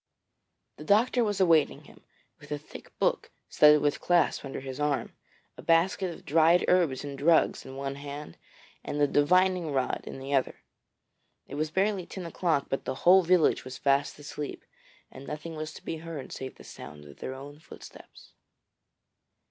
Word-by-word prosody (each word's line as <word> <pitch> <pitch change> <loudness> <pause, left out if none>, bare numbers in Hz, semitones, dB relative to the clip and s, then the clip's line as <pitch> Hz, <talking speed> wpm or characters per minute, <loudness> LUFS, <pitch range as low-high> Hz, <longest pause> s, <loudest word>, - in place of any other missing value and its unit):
The 150 - -9
doctor 235 +7 +3
was 205 -3 -1
awaiting 165 -5 +3
him, - - -18 0.4
with - - -15
a 150 - -1
thick 145 - -13
book - - 0 0.2
studded 150 0 +6
with 145 -1 0
clasps 175 -4 +2
under 135 - -6
his 135 0 -7
arm, 150 -2 -1 0.4
a - - -9
basket 175 +2 +2
of - - -12
dried 165 +3 +4
herbs 165 -8 +2
and 140 -1 -6
drugs 160 0 +2
in 130 - -9
one 135 0 -4
hand, 145 - -8 0.5
and 145 - -4
the 145 - +5
divining 180 +3 +2
rod 130 -2 -1
in - - -7
the 135 +1 -5
other. 135 -2 0 0.8
It - - -11
was 155 +2 -1
barely 190 +1 0
ten 185 -2 -7
o'clock, 165 -4 0
but 135 - -3
the - - -3
whole 185 +2 +8
village 180 -2 +3
was 130 0 -8
fast 140 +1 +1
asleep, 145 0 -7 0.5
and 135 +1 -11
nothing 155 +2 -6
was 155 0 -5
to - - -13
be 165 - -3
heard 160 -4 -8
save 130 0 -7
the - - -15
sound 75 0 -11
of 70 - -14
their 130 - -5
own 145 +2 -10
footsteps. - - -14
150 Hz, 175 wpm, -28 LUFS, 140-170 Hz, 0.8 s, whole